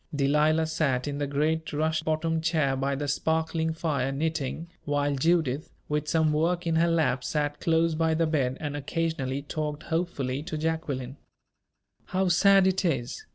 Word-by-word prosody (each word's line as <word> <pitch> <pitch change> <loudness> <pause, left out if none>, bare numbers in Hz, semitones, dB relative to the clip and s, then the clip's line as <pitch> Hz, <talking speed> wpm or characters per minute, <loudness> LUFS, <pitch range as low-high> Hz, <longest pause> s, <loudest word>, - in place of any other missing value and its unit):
Delilah 150 +3 +3
sat 145 -5 0
in 145 0 -3
the 145 - -1
great 155 +3 0
rush 155 +1 0
bottomed 160 0 -1
chair 155 -5 +1
by 135 +1 -1
the 145 +1 -3
sparkling 160 +3 0
fire, 150 -5 -1
knitting, 160 +2 -2 0.2
while 145 -1 0
Judith, 155 0 +1 0.2
with 150 0 -1
some 160 -1 +2
work 170 +3 +1
in 165 -1 +1
her 170 +1 +4
lap, 160 -6 +1
sat 145 -1 -1
close 165 0 +2
by 160 0 +1
the 165 +1 +2
bed, 135 -5 0
and 145 -2 -4
occasionally 145 -2 -2
talked 150 0 -4
hopefully 150 -6 -2
to 155 0 -5
Jacqueline. 145 -5 -3 0.9
"How 190 0 0
sad 195 +2 +5
it 190 +1 +1
is!" 130 -9 -2
155 Hz, 160 wpm, -27 LUFS, 140-165 Hz, 0.9 s, sad